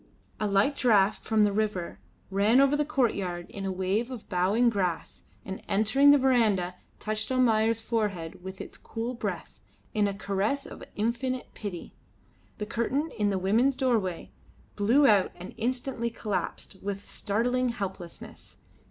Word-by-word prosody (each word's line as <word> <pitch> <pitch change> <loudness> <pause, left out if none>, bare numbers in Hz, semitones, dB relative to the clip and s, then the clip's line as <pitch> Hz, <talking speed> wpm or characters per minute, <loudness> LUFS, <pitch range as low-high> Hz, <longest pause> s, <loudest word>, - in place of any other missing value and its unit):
A 215 - 0
light 200 +8 +2
draught 215 -5 +3
from 220 -1 +3
the 205 -1 +2
river 205 -5 -2 0.3
ran 205 +6 +4
over 275 +1 +5
the 295 - +2
courtyard 200 - -1
in 195 -1 -5
a 190 - -1
wave 190 +6 -1
of 250 -5 -8
bowing 195 +6 +2
grass 185 -7 -1 0.2
and, 190 0 -6
entering 220 +8 +4
the 290 - +8
verandah, 225 -9 +2 0.3
touched 215 +2 -2
Almayer's 225 -3 +3
forehead 200 -7 -2
with 190 0 -7
its - - -9
cool 230 +2 -4
breath, 235 - -5 0.3
in 210 -1 +2
a 200 - -2
caress 205 +7 -1
of - - -10
infinite 245 +4 -2
pity. 195 -5 -7 0.6
The 210 - -3
curtain 255 +8 -1
in 205 -1 +3
the 195 - 0
women's 225 +9 +2
doorway 225 -10 0 0.4
blew 235 +8 +4
out 205 -6 +4
and 180 +2 -9
instantly 245 0 -2
collapsed 210 -3 -4
with 200 0 -5
startling 245 +4 0
helplessness. 190 -6 -7
215 Hz, 150 wpm, -28 LUFS, 195-245 Hz, 0.6 s, the